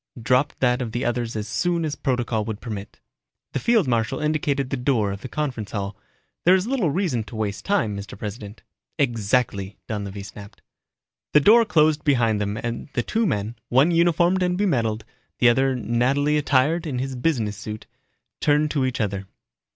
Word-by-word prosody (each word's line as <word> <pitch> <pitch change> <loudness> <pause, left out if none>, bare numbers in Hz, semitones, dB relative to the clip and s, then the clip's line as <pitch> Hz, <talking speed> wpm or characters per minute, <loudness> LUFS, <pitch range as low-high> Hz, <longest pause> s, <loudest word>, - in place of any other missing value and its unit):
Dropped 125 +4 +1
that 125 -1 +2
of 115 -3 -4
the 120 - -2
other's 120 -1 -1
as 105 0 -3
soon 175 -2 0
as 150 - -2
protocol 120 -4 -1
would 110 -2 -4
permit. 105 -4 -7 0.5
The - - 0
field 225 - +3
marshal 115 +1 0
indicated 145 -3 0
the - - +1
door 125 -6 +1
of 100 0 -6
the - - -6
conference 130 -9 -3
hall. 100 -1 -3 0.5
"There 180 +2 +6
is 190 0 0
little 240 - +1
reason 150 - 0
to 115 - -10
waste 105 -2 -3
time, 185 - +1
Mr. 100 0 -8
President." 105 +1 -7 0.3
"Exactly," 110 -5 0
Donlevy 100 -2 -5
snapped. 100 +1 -12 0.7
The 150 - +8
door 225 +9 +6
closed 155 -6 +3
behind 115 -7 +2
them 100 +1 -2
and 115 +4 -4
the 120 - 0
two 225 - 0
men, 110 - -2
one 135 +7 +4
uniformed 175 +2 +3
and 180 0 +1
bemedaled, 115 - 0 0.3
the 120 - +5
other 130 +2 +2
nattily 130 +5 +1
attired 150 +3 +2
in 135 -4 -3
his 130 +1 -3
business 120 -6 0
suit, 105 +1 -7 0.5
turned 150 0 +2
to 140 -3 +1
each 130 +1 -3
other. 100 -3 -2
125 Hz, 175 wpm, -23 LUFS, 110-150 Hz, 0.7 s, The